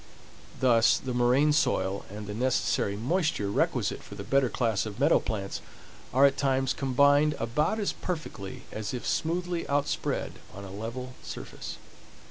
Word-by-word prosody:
Thus 115 Hz, -3 st, +5 dB
the 130 Hz, -1 st, -4 dB
moraine 125 Hz, +5 st, +4 dB
soil 95 Hz, -10 st, +1 dB
and 105 Hz, +1 st, -7 dB
the 105 Hz, -, -5 dB
necessary 115 Hz, -3 st, +1 dB
moisture 140 Hz, -, 0 dB
requisite -, -, 0 dB
for 100 Hz, -, -11 dB
the 100 Hz, -, -6 dB
better 135 Hz, +4 st, +2 dB
class 115 Hz, -3 st, 0 dB
of 105 Hz, -, -7 dB
meadow -, -, +5 dB
plants 100 Hz, -2 st, -4 dB, 0.5 s
are 135 Hz, +2 st, +6 dB
at 140 Hz, -, +3 dB
times 135 Hz, -1 st, +1 dB
combined 145 Hz, +3 st, +3 dB
about 150 Hz, -, 0 dB
as 205 Hz, -, 0 dB
perfectly 110 Hz, -, -5 dB
as 110 Hz, +3 st, -4 dB
if 125 Hz, -, -5 dB
smoothly 175 Hz, +1 st, -1 dB
outspread 145 Hz, 0 st, -1 dB, 0.2 s
on 100 Hz, -, -8 dB
a 95 Hz, -, -8 dB
level 115 Hz, +5 st, -5 dB
surface. -, -, -7 dB
125 Hz, 150 wpm, -28 LUFS, 105-145 Hz, 0.5 s, are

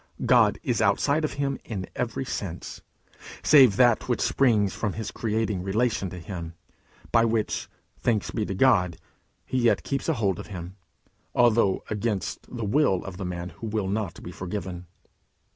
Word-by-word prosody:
God -, -, +5 dB
is -, -, 0 dB
outside 150 Hz, +3 st, +2 dB
of 155 Hz, -, -1 dB
him 140 Hz, -1 st, -2 dB
in 95 Hz, -5 st, -5 dB
every 125 Hz, +2 st, -2 dB
sense, 95 Hz, -9 st, -5 dB, 0.6 s
save 130 Hz, -9 st, +7 dB
that 120 Hz, 0 st, +3 dB
which 120 Hz, -, +1 dB
springs 110 Hz, -7 st, +2 dB
from 105 Hz, -4 st, -2 dB
his 110 Hz, -1 st, -5 dB
creating 110 Hz, -3 st, -1 dB
relation 100 Hz, +1 st, 0 dB
to 90 Hz, -, -8 dB
him, 85 Hz, -1 st, -7 dB, 0.6 s
by 115 Hz, -1 st, +5 dB
which, 115 Hz, -2 st, 0 dB, 0.3 s
thanks 110 Hz, -4 st, 0 dB
be 110 Hz, -, -1 dB
to 95 Hz, -, -3 dB
God, 90 Hz, -7 st, +3 dB, 0.5 s
he 130 Hz, -, -1 dB
yet 120 Hz, -2 st, +3 dB
keeps 135 Hz, +3 st, -2 dB
a -, -, +3 dB
hold 100 Hz, -, 0 dB
of -, -, -8 dB
him, 90 Hz, -2 st, -7 dB, 0.6 s
although 115 Hz, -5 st, +3 dB
against 105 Hz, -2 st, -2 dB
the 115 Hz, -3 st, -4 dB
will 105 Hz, -5 st, +2 dB
of 95 Hz, -2 st, -7 dB
the 95 Hz, -, -4 dB
man 90 Hz, 0 st, -4 dB
who 115 Hz, -, -8 dB
will 105 Hz, -2 st, -1 dB
not 100 Hz, -3 st, -3 dB
be -, -, -7 dB
forgiven. 90 Hz, -1 st, -5 dB
105 Hz, 165 wpm, -26 LUFS, 95-120 Hz, 0.6 s, save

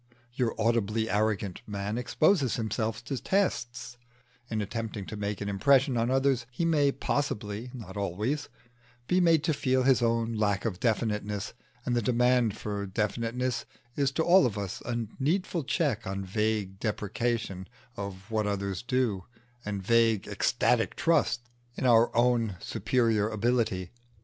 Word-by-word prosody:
Your 120 Hz, -3 st, -1 dB
audibly 110 Hz, -1 st, +1 dB
arrogant 105 Hz, -2 st, 0 dB
man 100 Hz, 0 st, -3 dB
exposes 135 Hz, -, +2 dB
himself 110 Hz, 0 st, -2 dB
to 135 Hz, -3 st, -4 dB
tests: 120 Hz, -11 st, -1 dB, 0.5 s
in 110 Hz, -, -1 dB
attempting 105 Hz, -1 st, -4 dB
to 110 Hz, -, -7 dB
make 105 Hz, -1 st, -3 dB
an 100 Hz, -, -3 dB
impression 130 Hz, +6 st, +3 dB
on 115 Hz, +1 st, +1 dB
others 135 Hz, -2 st, +2 dB
he 125 Hz, +7 st, -2 dB
may 150 Hz, -4 st, +3 dB
possibly 115 Hz, -6 st, -2 dB
(not 120 Hz, -5 st, -9 dB
always) 105 Hz, -, -2 dB, 0.6 s
be 180 Hz, +1 st, +3 dB
made 165 Hz, -3 st, +4 dB
to 160 Hz, -, +1 dB
feel 130 Hz, -2 st, +1 dB
his 130 Hz, -2 st, +4 dB
own 115 Hz, 0 st, +1 dB
lack 105 Hz, -2 st, 0 dB
of 95 Hz, -6 st, -2 dB
definiteness; 105 Hz, -3 st, -1 dB, 0.3 s
and 120 Hz, -, 0 dB
the 120 Hz, -, +2 dB
demand 120 Hz, -1 st, +2 dB
for 100 Hz, -1 st, -4 dB
definiteness 115 Hz, +5 st, -1 dB, 0.3 s
is 140 Hz, -2 st, +1 dB
to 160 Hz, -, +1 dB
all 175 Hz, -5 st, +6 dB
of 105 Hz, -4 st, -5 dB
us 100 Hz, -3 st, -4 dB
a 120 Hz, -1 st, -1 dB
needful 170 Hz, +3 st, 0 dB
check 130 Hz, -, 0 dB
on 95 Hz, 0 st, -3 dB
vague 105 Hz, -1 st, -1 dB
depreciation 105 Hz, -2 st, -2 dB, 0.3 s
of 100 Hz, +1 st, -7 dB
what 110 Hz, -1 st, 0 dB
others 100 Hz, -2 st, -2 dB
do, 115 Hz, -6 st, 0 dB, 0.4 s
and 100 Hz, -2 st, -4 dB
vague 115 Hz, -2 st, +3 dB
ecstatic -, -, +1 dB
trust 165 Hz, -7 st, +2 dB, 0.3 s
in -, -, -3 dB
our 120 Hz, -1 st, +6 dB
own 120 Hz, -4 st, +2 dB
superior 115 Hz, -2 st, +1 dB
ability. 110 Hz, -5 st, 0 dB
115 Hz, 145 wpm, -29 LUFS, 105-125 Hz, 0.6 s, all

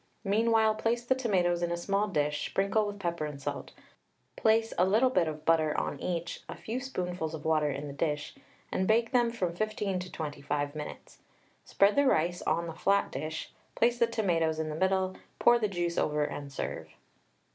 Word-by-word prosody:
Meanwhile 220 Hz, +1 st, +3 dB
place 235 Hz, +2 st, 0 dB
the 260 Hz, -, +4 dB
tomatoes 185 Hz, -9 st, +1 dB
in 175 Hz, 0 st, 0 dB
a 170 Hz, -, -1 dB
small 200 Hz, +4 st, 0 dB
dish, 150 Hz, -5 st, 0 dB
sprinkle 200 Hz, +2 st, +1 dB
with 205 Hz, 0 st, -5 dB
pepper 170 Hz, -4 st, -2 dB
and 145 Hz, -2 st, -7 dB
salt, 140 Hz, -, -5 dB, 0.6 s
place 225 Hz, +1 st, +2 dB
a -, -, +6 dB
little 220 Hz, +7 st, +4 dB
bit 180 Hz, -8 st, +2 dB
of 155 Hz, -1 st, -6 dB
butter 160 Hz, -2 st, +3 dB
on -, -, -3 dB
each, 170 Hz, -1 st, -3 dB
a -, -, -5 dB
few 230 Hz, +3 st, -4 dB
spoonfuls 180 Hz, -, -3 dB
of 155 Hz, -, -9 dB
water 155 Hz, -2 st, +2 dB
in 140 Hz, +1 st, -4 dB
the 140 Hz, -, -6 dB
dish, 150 Hz, 0 st, -2 dB, 0.4 s
and 185 Hz, -, 0 dB
bake 230 Hz, +1 st, +3 dB
them 240 Hz, -2 st, +3 dB
from 185 Hz, -7 st, -2 dB
15 210 Hz, -2 st, -1 dB
to 180 Hz, 0 st, -7 dB
25 145 Hz, -1 st, -3 dB
minutes. 150 Hz, -1 st, -8 dB, 0.5 s
Spread 200 Hz, +1 st, +3 dB
the 285 Hz, -, +4 dB
rice 175 Hz, -3 st, +2 dB
on 170 Hz, +2 st, 0 dB
a 165 Hz, -, -5 dB
flat 200 Hz, +4 st, +1 dB
dish, 155 Hz, +4 st, -5 dB, 0.2 s
place 240 Hz, +1 st, +2 dB
the 235 Hz, -, +4 dB
tomatoes 170 Hz, -8 st, +1 dB
in 160 Hz, 0 st, -2 dB
the 150 Hz, -, -4 dB
middle, 190 Hz, +2 st, +1 dB, 0.2 s
pour 240 Hz, 0 st, +5 dB
the 215 Hz, -, +1 dB
juice 175 Hz, -3 st, -1 dB
over, 150 Hz, 0 st, +1 dB
and 145 Hz, -1 st, -6 dB
serve. -, -, -5 dB
180 Hz, 190 wpm, -30 LUFS, 155-215 Hz, 0.6 s, a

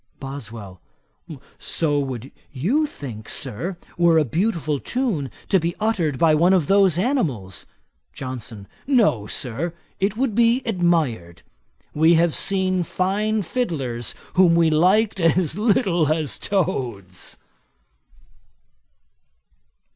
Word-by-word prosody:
BOSWELL. 115 Hz, -, -8 dB, 0.8 s
'So 145 Hz, -3 st, 0 dB, 0.5 s
you 155 Hz, -, -1 dB
would 305 Hz, -1 st, 0 dB
think, 110 Hz, -6 st, -8 dB
Sir, 170 Hz, -, -4 dB, 0.2 s
were 170 Hz, -1 st, +5 dB
a 155 Hz, -, +3 dB
beautiful 160 Hz, -, -1 dB
tune 215 Hz, -, -2 dB, 0.2 s
to 190 Hz, -, +4 dB
be 170 Hz, +1 st, -2 dB
uttered 190 Hz, -10 st, 0 dB
by 160 Hz, +1 st, +4 dB
one 170 Hz, +5 st, +4 dB
of 180 Hz, -5 st, +3 dB
those 195 Hz, -1 st, +4 dB
animals.' 155 Hz, -, -1 dB, 0.4 s
JOHNSON. 120 Hz, -6 st, -7 dB, 0.2 s
'No, 210 Hz, -, +3 dB
Sir, 140 Hz, +11 st, -2 dB, 0.2 s
it 195 Hz, +2 st, 0 dB
would 260 Hz, -3 st, 0 dB
be 235 Hz, +3 st, +3 dB
admired. 160 Hz, -, 0 dB, 0.5 s
We 160 Hz, +3 st, +5 dB
have 165 Hz, -1 st, +3 dB
seen 190 Hz, -2 st, +1 dB
fine 205 Hz, +5 st, 0 dB
fiddlers 135 Hz, -, -2 dB, 0.2 s
whom 180 Hz, -2 st, +5 dB
we 165 Hz, -1 st, +4 dB
liked 195 Hz, +7 st, +3 dB
as 165 Hz, 0 st, +2 dB
little 195 Hz, -, +2 dB
as 155 Hz, -10 st, -1 dB
toads.' 120 Hz, -, -2 dB
170 Hz, 110 wpm, -22 LUFS, 135-195 Hz, 0.8 s, were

